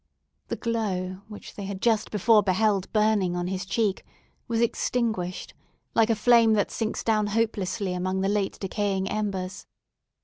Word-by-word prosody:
The - - -2
glow, 190 -5 -2
which 210 -1 -10
they 200 - -6
had 195 -1 -5
just 220 -1 +1
before 215 +1 +4
beheld 195 0 +1
burning 210 -4 +2
on 175 0 -2
his 190 +1 -3
cheek, 205 -3 0 0.4
was 230 -2 0
extinguished, 225 -5 -1 0.4
like 225 0 +3
a 225 - +3
flame 230 0 +5
that 205 -2 +1
sinks 220 -1 -2
down 215 -2 +2
hopelessly 205 -3 -1
among 185 +1 -1
the 195 - +1
late 200 -1 0
decaying 195 -1 -1
embers. 195 -3 -3
205 Hz, 150 wpm, -26 LUFS, 190-220 Hz, 0.4 s, flame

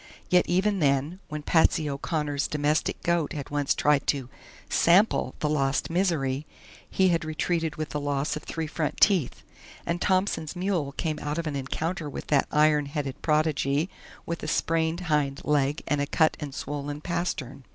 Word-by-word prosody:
Yet 180 0 +4
even 195 +3 +2
then, 145 +4 +1
when 150 -1 -5
Patsy 160 0 +3
O'Connor's 145 0 -1
domestic 150 +1 0
goat 170 -3 +1
had 145 -2 -6
once 145 -1 +1
tried 150 -2 +2
to 135 -3 0 0.4
"sample" 190 +6 +3
the 150 - +1
lost 140 -1 0
Misery, 155 -6 0 0.4
he 190 -1 +3
had 165 -2 +1
retreated 160 0 -1
with 155 -1 -4
the 150 - -3
loss 145 0 -1
of - - -5
three 165 -1 -4
front 155 0 -3
teeth, 185 - +3 0.4
and 170 +1 -2
Thompson's 185 -4 0
mule 175 -6 -1
came 155 +1 -2
out 150 +1 -3
of 170 - -2
an 150 -2 -3
encounter 155 +4 -3
with - - -6
that 145 -2 +3
iron 150 -1 +3
headed 140 -2 -4
prodigy 150 +1 +1 0.3
with 170 0 -4
a - - -5
sprained 165 +1 0
hind 150 -5 0
leg 145 0 +1
and 145 -1 +1
a 145 - -1
cut 160 +2 +3
and 145 -3 -6
swollen 145 0 -4
pastern. 170 -6 -3
150 Hz, 170 wpm, -27 LUFS, 145-170 Hz, 0.4 s, Yet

